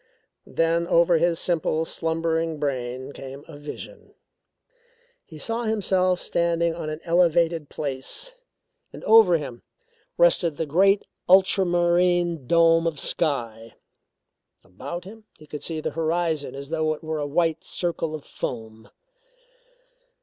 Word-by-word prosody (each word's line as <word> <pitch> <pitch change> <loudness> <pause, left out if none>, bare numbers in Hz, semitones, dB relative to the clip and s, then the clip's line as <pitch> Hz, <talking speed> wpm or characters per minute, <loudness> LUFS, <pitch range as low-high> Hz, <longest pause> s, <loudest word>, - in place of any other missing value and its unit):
Then 165 +1 0
over 170 -1 +4
his 170 0 +2
simple, 160 -2 0
slumbering 165 0 -1
brain 130 -2 -3
came 135 0 -10
a 160 - -11
vision. 145 0 -10 1.1
He 160 - -13
saw 230 +8 -2
himself 190 -4 +1
standing 170 0 0
on 165 -2 -5
an 155 +1 -6
elevated 170 -2 +2
place 150 - -4 0.6
and - - -11
over 215 -6 +6
him 130 -6 -8 0.6
rested 170 -2 +3
the 160 - -1
great 195 +7 +3 0.2
ultramarine 175 -4 +3
dome 165 0 +4
of 155 -4 -3
sky. 115 -9 -1 0.9
About 140 - -7
him 215 +3 -13
he 155 - -15
could 150 -1 -8
see 160 0 -3
the - - -3
horizon 160 -4 -1
as 140 +2 -8
though 155 -1 0
it 155 - -17
were 160 -1 -3
a 145 - -2
white 165 +1 0
circle 165 -3 -3
of 150 - -9
foam. 110 -2 -7
165 Hz, 130 wpm, -24 LUFS, 150-175 Hz, 1.1 s, over